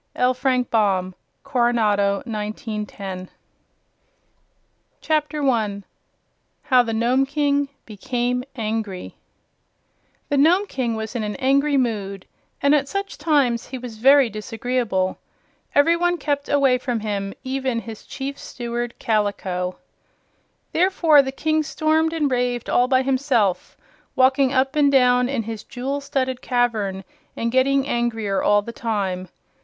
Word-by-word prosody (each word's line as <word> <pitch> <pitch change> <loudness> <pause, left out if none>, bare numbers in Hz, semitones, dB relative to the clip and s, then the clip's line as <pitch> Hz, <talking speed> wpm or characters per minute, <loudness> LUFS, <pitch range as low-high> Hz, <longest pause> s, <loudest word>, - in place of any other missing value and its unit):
L. 250 0 +2
FRANK 255 -1 0
BAUM. 190 -4 +1 0.3
Coronado, 210 -5 +1
1910 210 -4 -5 2.2
1. 215 -6 0 0.8
How 260 -4 +5
the 235 -2 -3
Nome 240 +4 +2
King 285 -1 +1 0.2
Became 245 +3 -2
Angry 215 -5 -4 1.2
The 285 - +1
Nome 350 +8 +4
King 250 - -2
was 220 +1 -5
in 235 - -1
an 210 -1 -3
angry 280 +2 +2
mood, 200 -6 -2 0.4
and 280 +1 +5
at 280 -2 +2
such 395 +6 -4
times 285 -7 +1
he 260 - -6
was 240 -3 -9
very 275 +2 +6
disagreeable. 215 -2 -2 0.6
Every 305 +4 +5
one 350 +1 +1
kept 285 -2 -2
away 275 -3 +3
from 245 -3 -2
him, 200 -2 -3
even 260 -2 -1
his 225 -2 -9
Chief 275 0 -5
Steward 240 0 -5
Kaliko. 200 -5 -1 1.0
Therefore 335 -4 +4
the 265 -1 -4
King 310 +3 0
stormed 315 +1 +1
and 305 -4 0
raved 245 -1 -1
all 245 - +3
by 260 0 +3
himself, 260 -8 0 0.4
walking 265 +1 +4
up 270 +2 +1
and 290 -2 +4
down 250 -2 +4
in 265 -5 -1
his 220 -1 -6
jewel 270 +3 -4
studded 260 -2 -2
cavern 220 -6 0 0.3
and 230 0 -1
getting 270 +2 +2
angrier 225 -6 -1
all 205 0 +3
the 235 - -7
time. 190 -6 -2
245 Hz, 130 wpm, -22 LUFS, 215-275 Hz, 2.2 s, very